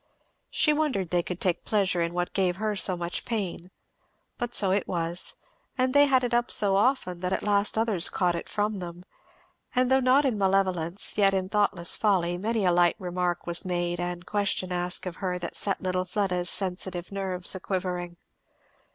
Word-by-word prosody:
She 300 Hz, -, +3 dB
wondered 275 Hz, -, -1 dB
they 175 Hz, -1 st, +2 dB
could 180 Hz, +1 st, -6 dB
take 175 Hz, -2 st, 0 dB
pleasure 195 Hz, -4 st, +1 dB
in 170 Hz, 0 st, -1 dB
what 175 Hz, 0 st, -3 dB
gave 185 Hz, -2 st, +1 dB
her 210 Hz, +1 st, -2 dB
so 185 Hz, -2 st, +2 dB
much 175 Hz, 0 st, -3 dB
pain; 190 Hz, -6 st, -4 dB, 0.7 s
but 240 Hz, 0 st, -2 dB
so 195 Hz, -2 st, +4 dB
it 195 Hz, 0 st, 0 dB
was; 170 Hz, 0 st, -1 dB, 0.4 s
and 255 Hz, 0 st, +1 dB
they 285 Hz, 0 st, +6 dB
had 260 Hz, -2 st, +3 dB
it 245 Hz, -1 st, -1 dB
up 240 Hz, 0 st, +1 dB
so 200 Hz, -2 st, +3 dB
often 200 Hz, -5 st, +1 dB
that 180 Hz, +1 st, -3 dB
at -, -, -1 dB
last 205 Hz, +1 st, +1 dB
others 220 Hz, -6 st, +2 dB
caught 180 Hz, -2 st, +1 dB
it 170 Hz, -, -5 dB
from 210 Hz, -1 st, -1 dB
them; 175 Hz, 0 st, -8 dB, 0.7 s
and 255 Hz, +1 st, +2 dB
though 265 Hz, -, +5 dB
not 265 Hz, +3 st, +4 dB
in 235 Hz, -6 st, 0 dB
malevolence 190 Hz, -1 st, +1 dB
yet 195 Hz, -1 st, +4 dB
in 185 Hz, 0 st, -1 dB
thoughtless 200 Hz, -4 st, +1 dB
folly 180 Hz, -5 st, +1 dB
many 215 Hz, +3 st, -1 dB
a 180 Hz, -, +4 dB
light 175 Hz, 0 st, +3 dB
remark 180 Hz, -1 st, -2 dB
was 170 Hz, 0 st, +2 dB
made 175 Hz, -1 st, -2 dB
and 175 Hz, 0 st, -4 dB
question 200 Hz, -3 st, -1 dB
asked 180 Hz, +1 st, -1 dB
of 180 Hz, -1 st, -6 dB
her 180 Hz, -2 st, -2 dB
that 175 Hz, -1 st, -5 dB
set 195 Hz, -, -1 dB
little 185 Hz, 0 st, 0 dB
Fleda's 180 Hz, -2 st, -1 dB
sensitive 185 Hz, -1 st, -2 dB
nerves 190 Hz, -2 st, 0 dB
a 190 Hz, -, -4 dB
quivering. 180 Hz, -2 st, -3 dB
185 Hz, 190 wpm, -27 LUFS, 175-210 Hz, 0.7 s, they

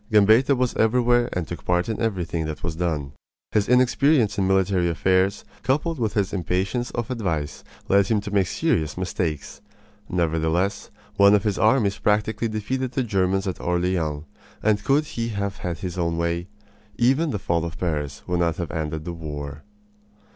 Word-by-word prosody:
Gambetta 110 Hz, +6 st, +5 dB
was 125 Hz, -1 st, 0 dB
everywhere 120 Hz, +1 st, +3 dB
and 90 Hz, -3 st, -3 dB
took -, -, -7 dB
part 90 Hz, 0 st, +1 dB
in 110 Hz, -, -3 dB
everything 90 Hz, -7 st, -1 dB
that 75 Hz, -, -6 dB
was 80 Hz, -1 st, -3 dB
done. 80 Hz, -5 st, -2 dB, 0.4 s
His 105 Hz, -1 st, +1 dB
inexperience 125 Hz, 0 st, +3 dB
in 95 Hz, -, +2 dB
military 95 Hz, -2 st, +2 dB
affairs, 95 Hz, +4 st, +1 dB, 0.2 s
coupled 155 Hz, +3 st, 0 dB
with 110 Hz, -3 st, -1 dB
his 100 Hz, -3 st, 0 dB
impatience 95 Hz, +6 st, -1 dB
of 120 Hz, 0 st, -4 dB
advice, 80 Hz, -11 st, -3 dB, 0.2 s
led 100 Hz, 0 st, +4 dB
him 110 Hz, -1 st, +2 dB
to 100 Hz, 0 st, -7 dB
make 95 Hz, -3 st, +3 dB
serious 80 Hz, -2 st, 0 dB
mistakes. 85 Hz, -5 st, -3 dB, 0.5 s
Nevertheless, 85 Hz, +3 st, 0 dB, 0.3 s
one 100 Hz, +1 st, +7 dB
of 105 Hz, -, +1 dB
his 105 Hz, -3 st, -1 dB
armies 110 Hz, -3 st, +3 dB
practically 105 Hz, +2 st, +1 dB
defeated 120 Hz, +4 st, -3 dB
the 130 Hz, -, 0 dB
Germans 95 Hz, -3 st, 0 dB
at 95 Hz, -, -4 dB
Orleans; 85 Hz, -4 st, -1 dB, 0.4 s
and 105 Hz, -1 st, +2 dB
could 140 Hz, +6 st, +2 dB
he 115 Hz, -5 st, -3 dB
have 100 Hz, -2 st, -3 dB
had 85 Hz, -2 st, -4 dB
his 90 Hz, +2 st, -5 dB
own 85 Hz, -1 st, 0 dB
way, 85 Hz, +1 st, -1 dB, 0.5 s
even 135 Hz, +7 st, +3 dB
the 105 Hz, -, -1 dB
fall 85 Hz, -3 st, -1 dB
of 85 Hz, -1 st, -5 dB
Paris 75 Hz, -5 st, -3 dB
would 90 Hz, -1 st, -1 dB
not 85 Hz, -2 st, +1 dB
have 85 Hz, -, -4 dB
ended 80 Hz, -1 st, -3 dB
the 85 Hz, -, -4 dB
war. 75 Hz, -3 st, -6 dB
95 Hz, 170 wpm, -24 LUFS, 85-110 Hz, 0.5 s, one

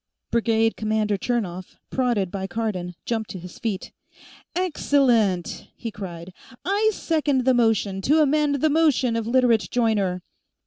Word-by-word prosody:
Brigade 225 Hz, -1 st, +2 dB
commander 215 Hz, -1 st, 0 dB
Chernov, 190 Hz, -5 st, -3 dB
prodded 235 Hz, -8 st, 0 dB
by 190 Hz, -1 st, -4 dB
Cardon, 195 Hz, -6 st, -3 dB
jumped 225 Hz, -2 st, -2 dB
to -, -, -6 dB
his 180 Hz, +1 st, -11 dB
feet. 215 Hz, -5 st, -3 dB, 0.6 s
"Excellent!" 250 Hz, -, +1 dB
he 230 Hz, -, -5 dB
cried. 180 Hz, -3 st, -8 dB, 0.3 s
"I 410 Hz, +4 st, +2 dB
second 300 Hz, -, 0 dB
the 260 Hz, -, +5 dB
motion 220 Hz, -5 st, +1 dB
to 295 Hz, +10 st, +3 dB
amend 295 Hz, -1 st, +2 dB
the 315 Hz, -, +3 dB
motion 290 Hz, -6 st, +3 dB
of 225 Hz, -1 st, -2 dB
Literate 240 Hz, -3 st, +3 dB
Joyner." 205 Hz, -7 st, 0 dB
225 Hz, 135 wpm, -24 LUFS, 195-265 Hz, 0.6 s, the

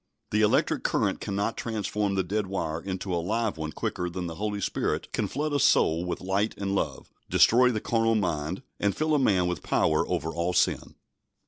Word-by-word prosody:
The 105 Hz, -, +2 dB
electric 105 Hz, -, +2 dB
current -, -, 0 dB
cannot 100 Hz, +3 st, -2 dB
transform 105 Hz, -2 st, -2 dB
the 95 Hz, -, +1 dB
dead 100 Hz, +3 st, -2 dB
wire 80 Hz, -4 st, -3 dB
into 95 Hz, -1 st, -4 dB
a 85 Hz, -, 0 dB
live 110 Hz, +4 st, -1 dB
one 80 Hz, 0 st, -3 dB
quicker 90 Hz, +3 st, -3 dB
than 90 Hz, +1 st, -4 dB
the 85 Hz, -, -4 dB
Holy 105 Hz, +3 st, -3 dB
Spirit 100 Hz, -, -2 dB
can -, -, 0 dB
flood 150 Hz, +2 st, -2 dB
a 145 Hz, -, +2 dB
soul 85 Hz, -8 st, +3 dB
with 90 Hz, -, -3 dB
light 95 Hz, +3 st, 0 dB
and 100 Hz, -1 st, -2 dB
love, 100 Hz, -, -3 dB, 0.2 s
destroy 125 Hz, +2 st, +5 dB
the 110 Hz, -3 st, -1 dB
carnal 115 Hz, -1 st, +2 dB
mind, 85 Hz, -4 st, -1 dB, 0.2 s
and 100 Hz, -1 st, 0 dB
fill 155 Hz, 0 st, +1 dB
a 150 Hz, -, +4 dB
man 95 Hz, -9 st, +3 dB
with 90 Hz, -4 st, -2 dB
power -, -, +2 dB
over 80 Hz, -, -1 dB
all 85 Hz, +1 st, -1 dB
sin. 90 Hz, -, +1 dB
100 Hz, 200 wpm, -27 LUFS, 90-110 Hz, 0.2 s, destroy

